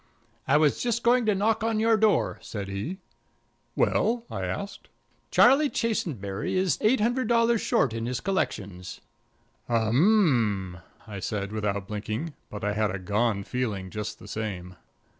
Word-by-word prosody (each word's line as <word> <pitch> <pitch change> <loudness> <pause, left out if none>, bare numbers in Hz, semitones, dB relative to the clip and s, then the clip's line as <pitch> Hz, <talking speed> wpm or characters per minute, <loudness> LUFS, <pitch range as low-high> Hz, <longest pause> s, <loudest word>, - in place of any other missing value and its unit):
"I 140 - +5
was 150 -2 +2
just 235 -1 -1
going 240 -1 +3
to 210 - +3
knock 215 +2 +1
on 225 -1 0
your 225 +1 +4
door," 215 -1 +2
said 100 -3 -6
he. 100 - -4 0.8
"Well?" 235 +1 +1
I - - -3
asked. 200 0 -6 0.4
"Charlie 275 +4 +5
Chasenberry 140 - -2
is 185 -6 +1
eight 235 +5 +3
hundred 245 +4 +1
dollars 230 -1 +3
short 125 - +1
in 115 0 -3
his 125 0 -2
collections." 100 - -3 0.7
"Um 115 - +2
m," - - -11 0.3
I 105 -3 -7
said, 100 0 -3
without 100 -3 -2
blinking, 110 +9 -4 0.2
but 105 - -8
I 105 0 0
had 105 0 +1
a 95 - -3
gone 105 +2 0
feeling 100 -6 -3
just 105 0 -5
the - - -13
same. 95 -4 -5
120 Hz, 155 wpm, -26 LUFS, -, 0.8 s, I